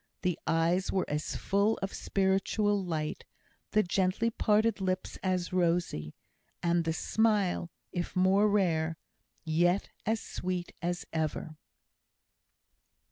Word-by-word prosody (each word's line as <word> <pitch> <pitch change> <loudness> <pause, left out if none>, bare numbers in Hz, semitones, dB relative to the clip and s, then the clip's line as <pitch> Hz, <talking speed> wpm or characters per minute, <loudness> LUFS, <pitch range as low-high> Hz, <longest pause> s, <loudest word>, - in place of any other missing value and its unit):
The 180 -2 0
eyes 170 +3 +2
were 190 - 0
as 150 +1 -2
full 200 +3 +1
of 195 - -3
spiritual 195 +1 +1
light, 155 -4 -3 0.5
the 215 - +3
gently 190 +5 +1
parted 215 -1 +2
lips 185 -1 -2
as 185 -1 -1
rosy, 170 - 0 0.5
and 170 -1 +2
the 165 - +1
smile, 205 -2 +1 0.2
if 175 -2 -3
more 190 +3 +4
rare, 165 -5 +1 0.5
yet 175 +4 +2 0.2
as 220 0 +2
sweet 180 -2 -4
as 175 0 -2
ever. 155 0 -2
185 Hz, 115 wpm, -30 LUFS, 170-200 Hz, 0.5 s, more